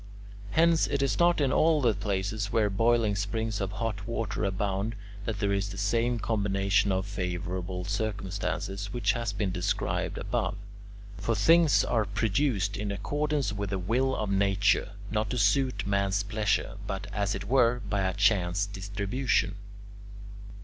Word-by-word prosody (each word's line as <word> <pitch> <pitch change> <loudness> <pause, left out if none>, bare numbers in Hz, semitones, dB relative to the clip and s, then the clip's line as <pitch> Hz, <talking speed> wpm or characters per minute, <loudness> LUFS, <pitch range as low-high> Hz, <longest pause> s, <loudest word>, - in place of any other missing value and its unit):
Hence 165 +7 +3
it 140 -1 0
is 140 - 0
not 175 -1 +4
in 140 -3 +2
all 160 -1 +4
the 120 -5 +3
places 100 +1 -2
where 110 -3 +2
boiling 115 0 +2
springs 105 +1 -2
of 95 +1 -2
hot 105 0 -3
water 110 -4 -2
abound, 100 +3 -1 0.3
that 110 -2 -2
there 100 -1 0
is 100 +1 -1
the 95 - -7
same 115 +4 +1
combination 100 -2 +1
of 95 0 0
favourable 90 -2 -4
circumstances 100 -1 -3
which 120 -3 +1
has 115 -4 -2
been 100 -2 -2
described 90 -1 -1
above. - - -1 0.6
For 110 +5 -1
things 165 - +5
are 110 -3 +1
produced 100 0 0
in 105 0 -3
accordance 145 +4 -1
with 100 -1 -3
the 95 - -1
will 125 +8 0
of 105 -2 -2
nature; 100 +1 +2 0.2
not 105 -1 0
to 125 - -2
suit 105 0 +2
man's 100 0 +1
pleasure, 105 0 -1
but 95 0 -4
as 100 -1 0
it - - -5
were 125 0 +3
by 100 -1 0
a 95 0 0
chance 100 -2 +2
distribution. 100 +3 -1
105 Hz, 155 wpm, -28 LUFS, 100-115 Hz, 0.6 s, things